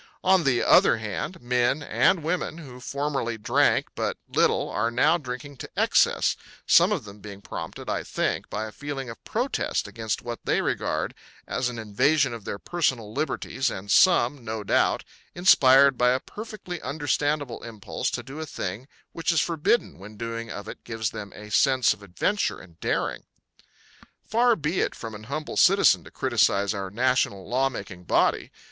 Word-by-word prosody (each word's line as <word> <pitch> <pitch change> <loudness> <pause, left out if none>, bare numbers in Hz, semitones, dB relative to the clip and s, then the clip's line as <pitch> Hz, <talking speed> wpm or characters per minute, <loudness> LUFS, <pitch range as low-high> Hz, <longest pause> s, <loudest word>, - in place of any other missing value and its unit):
On 185 -3 +4
the 125 -3 +2
other - - +5
hand, 110 - -5
men 125 +4 +1
and 170 +3 +2
women 165 0 -2
who 130 -7 -10
formerly 135 -3 -2
drank 105 - +2
but - - -2
little - - +2
are 110 +3 -1
now 145 +8 +3
drinking 135 0 -7
to - - -8
excess, - - +3 0.3
some - - +6
of - - -1
them 105 0 -12
being 100 -1 -10
prompted, - - -7
I - - -1
think, - - -2
by 110 +1 -3
a 110 - -8
feeling 135 -1 -6
of 115 - -13
protest 250 +4 -1
against 110 -2 -4
what 120 -1 -5
they - - +1
regard - - -1 0.3
as 125 -1 -1
an 120 - -7
invasion 130 +6 +2
of 115 -3 -8
their - - -4
personal 130 -9 -1
liberties 135 -1 -1
and 100 +2 -6
some, 140 - +4
no 110 -1 -4
doubt, - - +2 0.3
inspired 140 -7 +6
by 125 0 +4
a 130 - 0
perfectly 205 - -8
understandable 145 -1 -1
impulse 110 -4 -4
to - - -4
do 140 +3 -9
a 160 - -4
thing 105 +2 -5 0.2
which 165 +1 -1
is 165 - +2
forbidden 170 - 0
when 100 +3 -11
the - - -16
doing 115 0 -5
of 100 - -7
it - - -9
gives 110 -2 -3
them 100 -1 -7
a 105 0 -11
sense 130 +3 +4
of 105 - -16
adventure 100 - -1
and 85 -3 -16
daring. - - -2 1.0
Far 235 +1 +3
be 160 +2 -2
it - - 0
from 115 -1 -7
an 105 +1 -9
humble 150 +5 -5
citizen 195 +2 +5
to - - -11
criticise 110 -5 +1
our 100 -2 -4
national 120 -3 0
law 130 +2 +1
making 90 -8 -8
body. - - +1
125 Hz, 175 wpm, -25 LUFS, 110-150 Hz, 1.0 s, some